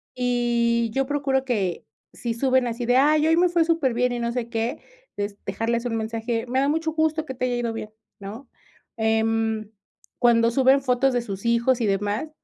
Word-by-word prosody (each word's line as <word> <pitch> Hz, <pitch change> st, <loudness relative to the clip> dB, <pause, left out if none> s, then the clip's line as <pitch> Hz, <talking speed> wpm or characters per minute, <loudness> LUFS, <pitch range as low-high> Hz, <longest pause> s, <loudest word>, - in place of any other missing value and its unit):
Y 235 Hz, -2 st, +1 dB
yo 270 Hz, +1 st, +1 dB
procuro 270 Hz, -1 st, 0 dB
que 200 Hz, -8 st, -2 dB, 0.3 s
si 235 Hz, -2 st, -3 dB
suben 260 Hz, +1 st, +2 dB
así, 235 Hz, +1 st, -3 dB
de: 245 Hz, +1 st, +3 dB
"Ay, 300 Hz, +3 st, +4 dB
hoy 325 Hz, +1 st, +3 dB
me 355 Hz, 0 st, +4 dB
fue 340 Hz, -1 st, +3 dB
superbién 260 Hz, -7 st, +1 dB
y 240 Hz, -, -3 dB
no 235 Hz, 0 st, -1 dB
sé 235 Hz, -1 st, -3 dB
qué", 230 Hz, 0 st, -2 dB, 0.4 s
es 205 Hz, 0 st, -3 dB
dejarles 230 Hz, +4 st, -2 dB
un 230 Hz, -2 st, -1 dB
mensaje. 225 Hz, +1 st, -2 dB
Me 260 Hz, +2 st, 0 dB
da 275 Hz, -, +2 dB
mucho 320 Hz, +1 st, 0 dB
gusto 315 Hz, 0 st, 0 dB
que 265 Hz, -, -6 dB
te 255 Hz, 0 st, -2 dB
haya 245 Hz, -, -1 dB
ido 235 Hz, -1 st, -2 dB
bien, 215 Hz, -1 st, -6 dB, 0.3 s
¿no? 220 Hz, +6 st, -9 dB, 0.5 s
Em. 220 Hz, -1 st, 0 dB, 0.5 s
Cuando 230 Hz, -1 st, +4 dB
suben 265 Hz, +2 st, +4 dB
fotos 255 Hz, +1 st, +2 dB
de 245 Hz, -, +1 dB
sus 200 Hz, 0 st, -7 dB
hijos 235 Hz, +2 st, +2 dB
y 220 Hz, -, +1 dB
demás, 205 Hz, +8 st, -1 dB
240 Hz, 195 wpm, -24 LUFS, 225-265 Hz, 0.5 s, Ay